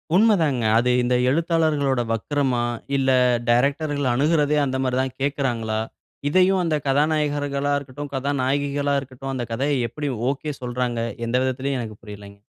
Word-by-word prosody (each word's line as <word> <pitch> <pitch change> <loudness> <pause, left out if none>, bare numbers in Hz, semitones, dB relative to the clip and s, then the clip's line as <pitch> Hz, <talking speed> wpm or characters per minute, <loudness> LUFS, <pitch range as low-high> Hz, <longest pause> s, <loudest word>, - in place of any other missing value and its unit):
உண்ம 215 +2 +5
தாங்க. 140 -6 +1 0.2
அது 125 +2 +2
இந்த 125 0 +1
எழுத்தாளர்களோட 155 -4 +1
வக்கரமா! 130 +1 0 0.3
இல்ல 135 0 +1 0.4
டைரக்டர்‌கள் 140 +2 +1
அணுகுறதே 150 +2 +2
அந்தமாரி 130 -1 -1
தான் 130 -1 -3
கேட்குறாங்களா? 120 -6 -1 0.5
இதையும் 185 +3 +3
அந்த 165 -3 +1
கதாநாயகர்களா 145 -1 +1
இருக்கட்டும், 140 +1 -7
கதாநாயகிகளா 140 +1 0
இருக்கட்டும் 135 0 -7
அந்த 125 -2 -3
கதையை 140 +4 0
எப்பிடி 145 +4 -4 0.2
ஒகே 145 +2 -3
சொல்றாங்க. 125 -1 -2 0.3
எந்த 115 - -1
விதத்திலயும் 130 +1 -1
எனக்கு 110 -3 -7
புரிலேங்க. 100 -1 -11
140 Hz, 130 wpm, -23 LUFS, 125-145 Hz, 0.5 s, உண்ம